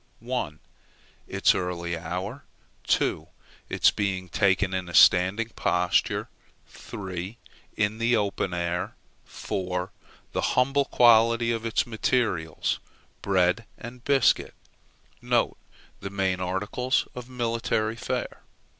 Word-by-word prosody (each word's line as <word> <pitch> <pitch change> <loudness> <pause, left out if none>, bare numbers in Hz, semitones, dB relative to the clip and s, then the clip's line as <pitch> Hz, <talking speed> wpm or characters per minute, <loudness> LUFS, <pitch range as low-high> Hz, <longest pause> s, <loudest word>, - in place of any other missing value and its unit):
1, 75 0 -3 0.7
its - - +3
early 85 -1 -2
hour 90 - -5 0.4
2, - - +1 0.4
its - - +4
being 95 -3 -2
taken 95 +3 +2
in 90 -1 -3
a 85 - -5
standing 95 +6 +5
posture 90 -5 +1 0.4
3, 95 +2 -7 0.4
in 110 +1 0
the 115 +1 +3
open 100 -3 -1
air 90 0 -2 0.3
4, 90 -2 -4 0.4
the - - -1 0.2
humble 135 +2 +3
quality 115 -1 +5
of 115 0 -2
its 115 - +1
materials 110 -9 0 0.4
bread 95 +3 +1
and 120 +1 -10
biscuit, 140 -1 +2 0.7
(the 100 - -3
main 95 -2 0
articles 105 +8 -1
of 125 0 -8
military 115 -2 -1
fare.) - - -4
100 Hz, 105 wpm, -26 LUFS, 90-115 Hz, 0.7 s, standing